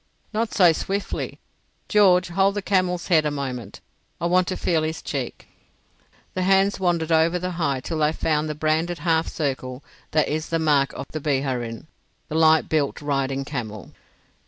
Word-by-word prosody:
"Not 225 +1 -1
so 180 -3 +6
swiftly. 195 +5 -3 0.5
George, 185 -4 +4
hold 195 +3 +2
the 205 - -2
camel's 185 -2 0
head 160 -4 +5
a 150 - 0
moment. 135 -4 -5 0.4
I 170 - -2
want 180 +1 +3
to 185 - -2
feel 165 -3 +1
his 155 0 -2
cheek." 135 -4 -5 0.9
The 185 - -2
hands 195 +2 +3
wandered 170 -3 0
over 165 +2 +3
the 180 +1 -3
hide 145 -7 -1
till 160 +2 -3
they 150 0 +3
found 155 -1 0
the 150 - -3
branded 160 +3 0
half 165 +1 +1
circle 130 -3 -3 0.3
that 155 -1 +2
is 155 +1 -3
the 165 - +1
mark 145 -4 +2
of - - -6
the 155 - -4
Biharin, 130 -5 -2 0.4
the 155 - -4
light 160 0 +5
built 150 -3 0
riding 135 -2 -1
camel. 110 - -6
160 Hz, 170 wpm, -23 LUFS, 140-180 Hz, 0.9 s, so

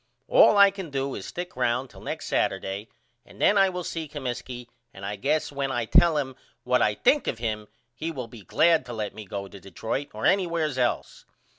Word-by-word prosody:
All - - +6
I 200 0 +8
can 190 -4 -7
do 135 -1 -2
is - - -6
stick 180 +1 -6
round 125 +1 0
till - - -14
next - - -5
Saturday 100 +3 -1 0.3
and - - -17
then 205 - +4
I 195 -1 +5
will 180 -1 -4
see 165 -1 -4
Comiskey 125 -3 -5 0.3
and 95 +1 -9
I 105 +1 -3
guess 145 +10 0
when 140 -1 -2
I 120 -3 -1
tell 170 +5 +5
him 130 -3 -2 0.3
what 125 0 +2
I 105 - +3
think 290 - +3
of 115 - -1
him 110 -2 -3 0.3
he 155 +7 -4
will 130 -7 -5
be 115 -1 -12
glad 165 - +3
to 120 - -6
let 105 -2 -3
me 110 - -9
go 100 +1 -5
to 100 - -12
Detroit 110 - -4
or 110 - -3
anywheres 170 -7 +1
else. 120 -1 -1
130 Hz, 210 wpm, -26 LUFS, 110-165 Hz, 0.3 s, I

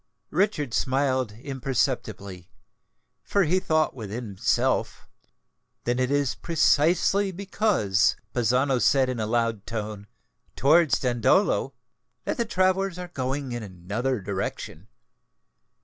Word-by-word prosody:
Richard 180 - 0
smiled 130 -3 +1
imperceptibly; 115 - -3 0.7
for 200 - +1
he 180 +3 +2
thought 155 -3 +1
within 115 0 -6
himself, 100 -3 -1 0.8
"Then 120 +1 0
it 130 0 +1
is 145 -2 +1
precisely 175 +4 +2
because 185 - +1 0.2
Bazzano 125 +2 +2
said 135 -1 +3
in 125 -2 -3
a 110 - -1
loud 115 -2 -1
tone, 105 -2 -5 0.5
'Towards 155 +3 +4
Dandolo,' 125 - +2 0.5
that - - -2
the 235 - 0
travellers 190 -2 +1
are 180 -1 -7
going 135 -2 -3
in 120 0 -4
another 105 +6 -3
direction." 95 -2 -5
130 Hz, 110 wpm, -25 LUFS, 110-165 Hz, 0.8 s, Towards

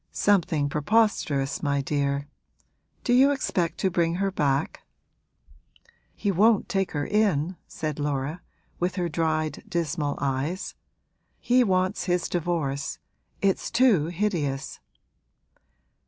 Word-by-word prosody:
'Something 175 -7 +2
preposterous, 150 -4 +1
my 140 -1 +1
dear. 140 0 -1 0.8
Do 245 - +2
you 265 +3 +6
expect 185 -11 -1
to 190 - +2
bring 170 -1 +1
her 195 +1 0
back?' 145 -4 0 1.3
'He 200 - 0
won't 210 +3 +3
take 195 -1 -1
her 145 -1 -1
in,' 190 -5 +1
said 155 -2 -4
Laura, 145 +3 -2 0.4
with 180 +1 -1
her 180 -3 0
dried, 155 -1 -1
dismal 160 -5 -1
eyes. 140 +6 -2 0.7
'He 250 +1 +3
wants 185 -2 0
his 180 -1 0
divorce 155 -5 -2 0.5
it's 195 -1 +1
too 230 - +4
hideous!' 170 -7 -2
170 Hz, 110 wpm, -26 LUFS, 145-195 Hz, 1.3 s, you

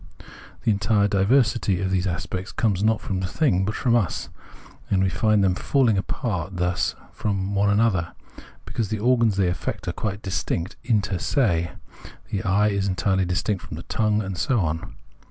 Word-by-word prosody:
The 110 - +3
entire 100 0 +2
diversity 105 0 +2
of 95 0 -1
these 95 0 +1
aspects 90 +2 -4
comes 100 -4 0
not 110 0 +2
from 95 -2 -3
the 95 - -2
thing, 95 - +1
but 105 +2 -2
from 120 -2 +2
us; 105 -7 0 0.6
and 95 -1 +2
we 95 - +2
find 110 0 +2
them 95 -1 +3
falling 120 +3 +2
apart 95 -2 -3
thus 90 0 0 0.2
from 100 -1 -2
one 100 0 +2
another, 100 -5 +2 0.5
because 110 -4 -3
the 110 - -1
organs 115 -2 +2
they 95 -2 +3
affect 90 0 -3
are - - +1
quite 105 -1 -4
distinct 95 -2 -2
inter 100 -6 0
se, 85 - +1 0.6
the 100 - -1
eye 100 +2 +2
is 100 -1 0
entirely 95 0 +1
dis 90 0 -1
tinct 105 -4 -1
from - - -8
the - - -7
tongue, 105 -1 +1
and 95 -2 -5
so 125 -3 +2
on. 80 -1 -3
100 Hz, 180 wpm, -24 LUFS, 95-110 Hz, 0.6 s, The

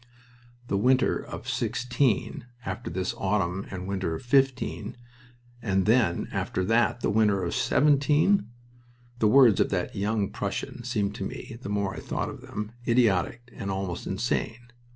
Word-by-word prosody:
The 100 - 0
winter 130 +4 +3
of - - -8
'16, 120 0 0 0.2
after 95 -2 -4
this 90 +2 -2
autumn 95 -1 0
and 95 -1 -6
winter 95 -4 -2
of - - -8
'15, 130 -3 +1 0.6
and 95 -4 +1
then 110 -6 +2
after 95 - -2
that 115 +3 +2
the - - +1
winter 105 -2 +3
of 85 - -2
'17! 145 - +3 0.7
The 110 - +4
words 125 -2 +6
of - - +3
that 90 +1 -2
young 105 0 0
Prussian - - -4
seemed 100 -1 -1
to 100 - -5
me, 115 +4 -7
the 100 - -6
more 100 -1 -1
I - - -6
thought - - -3
of - - -9
them, 105 +1 -6 0.2
idiotic 115 0 +2
and 100 -4 -5
almost 95 -2 -3
insane. 120 +1 -2
105 Hz, 155 wpm, -27 LUFS, 95-120 Hz, 0.7 s, words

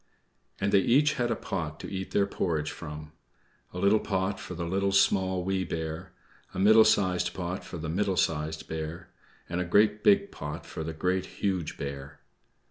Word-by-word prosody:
And 100 0 0
they 100 - +6
each 145 +9 +4
had 120 -5 -1
a - - +1
pot 80 -5 -4
to - - -6
eat 95 0 -4
their 100 - +2
porridge 80 -6 -1
from: 75 0 -8 0.6
a - - -8
little 100 +4 +4
pot 95 -1 -1
for 90 - -7
the 85 0 -3
Little, 95 +3 0
Small, 95 -2 +2
Wee 95 0 0
Bear; 80 -2 -5 0.4
a - - -3
middle 110 +3 +7
sized 90 -5 +2
pot 90 +1 -4
for 85 - -7
the 80 0 -5
Middle 95 +3 0
Sized 80 0 -1
Bear; 80 +2 -6 0.4
and 90 +1 -2
a - - +1
great 105 +4 +3
big 200 -1 +4
pot 75 +2 -6
for 80 - -6
the 80 +1 -4
Great, 90 +3 -1
Huge 95 -5 -2
Bear. 70 0 -6
90 Hz, 185 wpm, -28 LUFS, 80-100 Hz, 0.6 s, middle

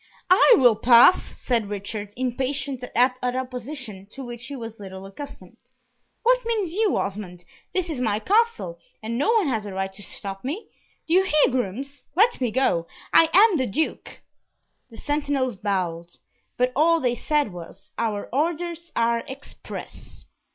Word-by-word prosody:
"I 400 +6 +8
will 245 -7 +6
pass!" 240 - +7 0.2
said 230 -5 0
Richard, 205 0 -5
impatient 260 +1 -2
at 250 +1 +3
opposition, 250 -4 -4
to 270 +4 -9
which 240 -1 -8
he 285 - -6
was 225 -3 -8
little 190 -1 -9
accustomed. 195 -1 -10 0.7
"What - - +3
mean 455 -3 0
you, 390 +4 +1
Osmond? 185 -3 -4 0.3
This 370 -2 -1
is 300 -7 -4
my 215 -4 +1
Castle, 395 - +1 0.2
and 225 +2 -3
no 290 - +2
one 440 -7 +3
has 220 -5 -1
a 195 - -6
right 190 0 -2
to 200 - -8
stop 195 -1 -7
me. 310 - -5 0.4
Do 325 - 0
you 370 - +6
hear, 305 -7 +3
grooms? 260 +4 -3
let 430 - +3
me 250 - +1
go. 205 -8 +1 0.3
I 330 - +7
am 400 0 +6
the 260 - 0
Duke!" 310 +11 -3 0.7
The 225 - -13
sentinels 285 -4 -1
bowed, 180 -4 -2 0.5
but 250 +1 +2
all 330 +4 +4
they 250 -5 +1
said 290 -4 0
was, 180 +3 -11
"Our 215 -3 -1
orders 340 +3 -2
are 235 0 +2
express." 265 - -10
250 Hz, 160 wpm, -24 LUFS, 205-310 Hz, 0.7 s, I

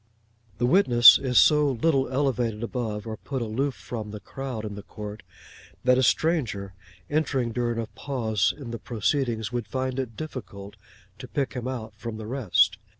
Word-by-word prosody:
The 120 - +1
witness 125 -6 +7
is 125 -3 0
so 150 -2 +5
little 135 +1 +1
elevated 125 -5 0
above, 115 -3 -3
or 110 -1 -5
put 130 +1 -4
aloof 130 +5 -1
from, 110 -3 -6
the 105 0 -7
crowd 125 +1 -6
in 105 - -5
the 100 - -7
court, 105 +1 -8 0.6
that 125 0 +4
a - - +4
stranger 120 - +1 0.3
entering 140 -5 0
during 120 0 -1
a 115 - -1
pause 110 -1 -1
in 135 -6 -8
the 115 - -5
proceedings 120 -1 -1
would 120 -3 -3
find 130 +2 -2
it 115 -5 -4
difficult 105 -9 -7 0.4
to 125 - -8
pick 135 +1 -2
him 125 -1 -4
out 115 -4 -5
from 115 0 -6
the 110 - -7
rest. 105 -5 +2
120 Hz, 170 wpm, -26 LUFS, 110-135 Hz, 0.6 s, witness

